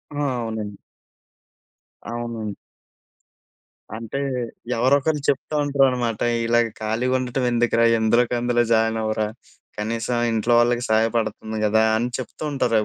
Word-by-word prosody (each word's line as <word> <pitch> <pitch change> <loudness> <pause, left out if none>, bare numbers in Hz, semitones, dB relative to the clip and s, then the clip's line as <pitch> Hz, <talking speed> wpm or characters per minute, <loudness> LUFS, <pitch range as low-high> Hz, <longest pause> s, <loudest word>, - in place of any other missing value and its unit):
ఆ! 145 - -2 0.2
అవునండి. 110 -3 -5 1.3
అవునండి. 115 -3 -4 1.4
అంటే, 115 +4 -5 0.6
ఎవరో 130 +4 +4
ఒకళ్ళు 150 +1 -1
చెప్తూ 140 +2 -1
ఉంటారనమాట. 130 -5 +1 0.3
ఇలాగ 120 0 +3
ఖాళీగుండటం 125 +3 0
ఎందుకురా 115 -1 +2
ఎందులోకందులో 120 +1 +2
జాయిన్ 110 0 +2
అవ్వరా. 110 0 0 0.5
కనీసం 115 +3 -2
ఇంట్లో 115 +1 +1
వాళ్ళకి 120 0 +2
సహాయపడుతుంది 110 -1 0
గదా, 110 +1 +3
అని 120 +2 -1
చెప్తూ 130 - -7
ఉంటారు 120 -4 +1
115 Hz, 105 wpm, -22 LUFS, 110-125 Hz, 1.4 s, ఎవరో